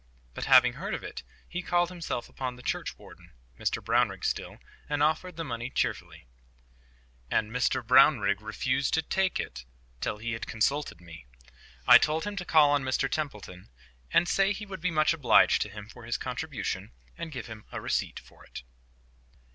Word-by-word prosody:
But, - - -5
having - - +6
heard - - -4
of - - -7
it, - - -7 0.3
he 180 - -4
called 175 -1 +1
himself 170 -9 -4
upon 125 -1 -5
the 125 - -14
churchwarden—Mr - - -5
Brownrigg - - +1
still—and 145 0 -3
offered 160 +3 0
the 165 - -4
money 120 -4 -4
cheerfully. 130 - -3 1.0
AND 105 0 0
MR 125 0 0
BROWRIGG 120 -5 +5
REFUSED 130 +6 -1
TO 160 - +2
TAKE 190 +3 0
IT 65 0 -6 0.3
TILL 105 - -2
HE 115 +2 -4
HAD 115 - -4
CONSULTED 135 - -1
ME! 80 -7 -13 0.6
I - - +10
told 155 +1 0
him 205 0 -4
to 180 - -4
call 150 -4 +5
on 145 -1 +2
Mr 130 0 0
Templeton, 105 - -5 0.4
and 175 - +4
say 195 +2 +2
he 210 +1 -7
would 190 -4 -8
be 185 - +1
much 155 +1 +3
obliged 150 -6 +4
to 105 - -1
him 105 0 -9
for 115 +1 -13
his 120 - -1
contribution, - - -4 0.2
and 170 -1 -6
give 130 -5 -6
him 110 -2 -10
a - - -4
receipt - - -2
for - - -19
it. - - -10
135 Hz, 170 wpm, -28 LUFS, 110-165 Hz, 1.0 s, I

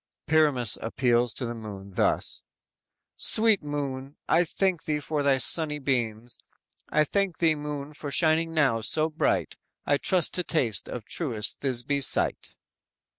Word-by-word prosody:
"_ - - -57
Pyramus 145 -8 +3
appeals 120 0 +1
to 125 - 0
the 120 - -4
moon 100 -4 -9
thus: - - -1 0.8
_"Sweet 220 -2 +4
moon, 140 -2 -5
I 175 +2 +3
thank 185 0 -1
thee 150 -1 -1
for 150 0 -3
thy 140 -1 +2
sunny 150 +4 +3
beams, 120 -4 -3 0.5
I 155 - +2
thank 195 +3 -2
thee, 165 -2 +2
moon, 150 -1 -6
for 145 0 -7
shining 160 +2 +1
now 140 -8 +1
so 155 +7 -1
bright, 155 - -1 0.3
I 145 - +2
trust 180 -3 +1
to 180 - -1
taste 120 - 0
of 115 -4 -7
truest 115 -10 0
Thisby's 135 +1 +2
sight!" - - +1
145 Hz, 150 wpm, -26 LUFS, 120-155 Hz, 0.8 s, Sweet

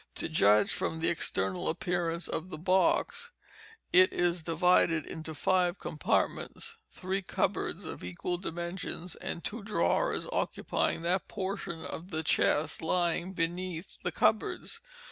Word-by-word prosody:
To - - -2
judge 105 -9 +4
from 160 - -2
the 165 - +2
external 95 - 0
appearance 175 -2 -1
of 170 +3 -3
the 155 - -6
box, 190 - +2 0.6
it 185 +1 +7
is 175 -1 +1
divided 165 -1 +3
into 160 -1 -6
five 180 +3 +2
compartments—three 185 +5 -2
cupboards 185 - -1
of - - -7
equal 90 - -3
dimensions, 175 0 -4
and 170 - -5
two 230 +2 -4
drawers 220 - +1
occupying 165 - 0
that 180 +2 +1
portion 190 -4 -4
of 175 +3 -6
the 160 -2 -2
chest 155 0 +2
lying 175 +2 0
beneath 175 0 -3
the - - -1
cupboards. 455 - +1
175 Hz, 125 wpm, -31 LUFS, 160-185 Hz, 0.6 s, it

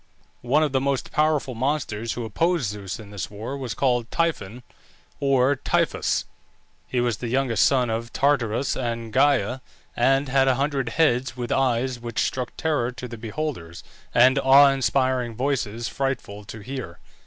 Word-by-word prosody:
One 140 +6 +2
of 150 - 0
the 130 -1 +1
most 135 -1 -1
powerful 150 -4 +1
monsters 115 -3 -2
who 120 - -4
opposed 160 - 0
Zeus 100 -1 -6
in 105 -2 -11
this 100 -4 -5
war 110 +6 -6
was 130 -5 -5
called 120 -3 +1
Typhon 125 - -2 0.6
or 135 0 +3
Typhoeus. - - 0 0.6
He 125 - -1
was 120 -3 0
the 120 - -5
youngest 125 -1 +1
son 125 -4 +2
of 115 +1 -3
Tartarus 135 -3 +1
and 115 -3 -4
Gæa, 130 -3 +2 0.3
and 135 +3 +2
had 135 +1 +3
a 130 - +4
hundred 135 -2 -1
heads, 130 -4 +1
with 120 -1 -4
eyes 130 -1 +1
which 120 -2 -7
struck 125 -2 -4
terror 150 -7 0
to 125 0 -8
the 120 - -8
beholders, 110 - -5 0.3
and 130 +3 +5
awe 135 +1 +7
inspiring 130 -3 0
voices 120 -3 -2
frightful 120 -7 -3
to 110 +1 -9
hear. 125 -7 -6
125 Hz, 160 wpm, -24 LUFS, 115-135 Hz, 0.6 s, awe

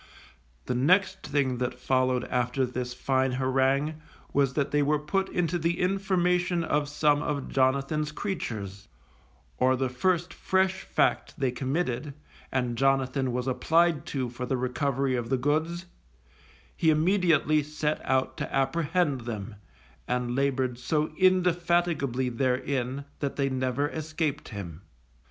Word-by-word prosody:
The - - -1
next 180 +11 +2
thing 135 -4 0
that 125 0 -2
followed 130 -1 +1
after 125 +2 0
this 125 0 -4
fine 130 +1 0
harangue 135 +4 +1 0.3
was 135 -1 +2
that 145 -2 0
they 145 - +3
were 150 +1 +2
put 190 +6 -1
into 175 0 0
the 170 +2 0
information 180 -2 +1
of 150 -2 0
some 150 0 +2
of 145 -3 -3
Jonathan's 140 +3 +1
creatures; 105 - -5 0.7
or 130 +1 +4
the 130 0 -1
first 175 +6 0
fresh 190 0 +1
fact - - 0
they 135 -2 0
committed 135 +1 -2 0.4
and 125 -3 -1
Jonathan 135 -1 +2
was 125 0 -2
applied 165 +4 +2
to 130 -3 -2
for 120 +1 -6
the 130 - 0
recovery 130 +1 0
of 120 -2 -3
the 130 - +2
goods, 160 +6 0 0.9
he 160 - +2
immediately 155 -2 +3
set 150 +1 -2
out 130 0 0
to - - -4
apprehend 150 0 +1
them, 110 -2 -5 0.5
and 125 -1 -1
laboured 130 -3 0
so 150 +4 -1
indefatigably 175 -7 +2
therein 130 +2 -1
that 140 -2 -2
they 140 -1 0
never 130 +2 0
escaped 155 -1 -3
him. 90 -6 -7
140 Hz, 135 wpm, -27 LUFS, 130-160 Hz, 0.9 s, or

